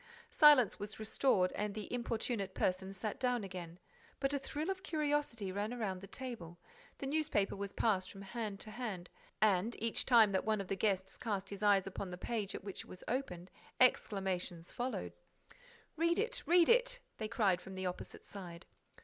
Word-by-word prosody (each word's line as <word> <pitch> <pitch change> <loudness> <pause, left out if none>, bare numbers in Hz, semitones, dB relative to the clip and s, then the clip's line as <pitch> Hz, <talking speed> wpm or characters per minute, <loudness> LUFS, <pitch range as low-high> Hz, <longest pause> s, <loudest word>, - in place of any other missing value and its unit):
Silence 290 -8 +7
was 205 +2 -6
restored 215 -4 +2
and 210 0 -3
the 215 +1 -5
importunate 230 -4 -2
person 190 +1 0
sat 200 +2 -4
down 250 -3 +1
again: 180 -3 -7 0.4
but 275 0 0
a 280 - +1
thrill 300 +6 -3
of 380 -1 -5
curiosity 295 - -1
ran 210 +5 -2
round 190 -5 -2
the 195 - -9
table, 220 -11 -7 0.4
the - - -5
newspaper 285 -9 +1
was 200 0 -4
passed 190 -5 +1
from 195 0 -10
hand 210 -1 -4
to 215 - -7
hand 205 -6 -5 0.3
and, 215 +2 +3
each 230 0 +1
time 230 -5 +7
that 190 - +1
one 215 -1 +1
of 195 - -5
the 195 - 0
guests 190 -1 0
cast 200 -4 -2
his 200 0 -6
eyes 200 -3 +5
upon 195 0 -5
the 180 - -6
page 210 0 -2
at - - -6
which 195 -2 -6
it - - -14
was 185 - -10
opened, 185 -8 -3 0.3
exclamations 190 -8 +2
followed: 235 - -3 0.8
"Read 335 +2 +2
it! 465 +4 0
Read 345 0 +6
it!" - - +4 0.2
they 215 - -2
cried 200 -5 +2
from 190 - -9
the 185 0 -3
opposite 180 0 -5
side. 175 -3 -9
210 Hz, 185 wpm, -35 LUFS, 190-250 Hz, 0.8 s, Silence